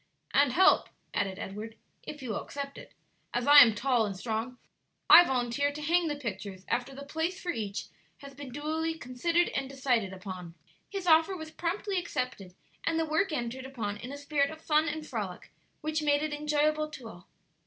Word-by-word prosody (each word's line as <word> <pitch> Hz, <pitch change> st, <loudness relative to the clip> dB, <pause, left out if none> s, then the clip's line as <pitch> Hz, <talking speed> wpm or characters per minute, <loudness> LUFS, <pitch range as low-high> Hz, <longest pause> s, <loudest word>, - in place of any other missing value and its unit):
"And 280 Hz, -3 st, +4 dB
help," 375 Hz, +6 st, +5 dB, 0.2 s
added 190 Hz, -1 st, -1 dB
Edward, 215 Hz, +3 st, -7 dB, 0.2 s
"if 295 Hz, -2 st, -8 dB
you 245 Hz, -, -3 dB
will 205 Hz, -, -2 dB
accept 280 Hz, -1 st, -6 dB
it. -, -, -14 dB, 0.4 s
As 240 Hz, 0 st, 0 dB
I 290 Hz, 0 st, +10 dB
am 230 Hz, -6 st, +8 dB
tall 245 Hz, 0 st, +2 dB
and 195 Hz, -2 st, -5 dB
strong, 225 Hz, +4 st, -3 dB, 0.5 s
I 350 Hz, -, +12 dB
volunteer 265 Hz, 0 st, 0 dB
to 295 Hz, -, -8 dB
hang 335 Hz, +3 st, +2 dB
the 295 Hz, -, -1 dB
pictures 200 Hz, -7 st, -6 dB
after 250 Hz, +2 st, -2 dB
the 280 Hz, +1 st, -8 dB
place 320 Hz, +5 st, -2 dB
for 360 Hz, -, -2 dB
each 210 Hz, -7 st, -4 dB, 0.3 s
has 280 Hz, 0 st, -11 dB
been 275 Hz, 0 st, -9 dB
duly 315 Hz, +4 st, -2 dB
considered 330 Hz, +7 st, 0 dB
and 270 Hz, -1 st, -3 dB
decided 250 Hz, -7 st, 0 dB
upon." 185 Hz, -3 st, -8 dB, 0.3 s
His 390 Hz, -2 st, -5 dB
offer 330 Hz, +3 st, +4 dB
was 315 Hz, -1 st, -8 dB
promptly 370 Hz, +4 st, -2 dB
accepted, 250 Hz, -, -4 dB, 0.3 s
and 330 Hz, -, 0 dB
the 325 Hz, -, +1 dB
work 315 Hz, +4 st, +1 dB
entered 260 Hz, -1 st, -3 dB
upon 215 Hz, -6 st, -4 dB
in 245 Hz, +5 st, -8 dB
a 285 Hz, -, -6 dB
spirit 285 Hz, -1 st, 0 dB
of 315 Hz, -, -9 dB
fun 310 Hz, 0 st, +2 dB
and 310 Hz, 0 st, -5 dB
frolic, 205 Hz, -9 st, -5 dB, 0.3 s
which 310 Hz, 0 st, -1 dB
made 290 Hz, 0 st, +2 dB
it 310 Hz, -1 st, -2 dB
enjoyable 300 Hz, +1 st, +1 dB
to 260 Hz, -6 st, -9 dB
all. 180 Hz, -5 st, -12 dB
280 Hz, 190 wpm, -30 LUFS, 230-310 Hz, 0.5 s, I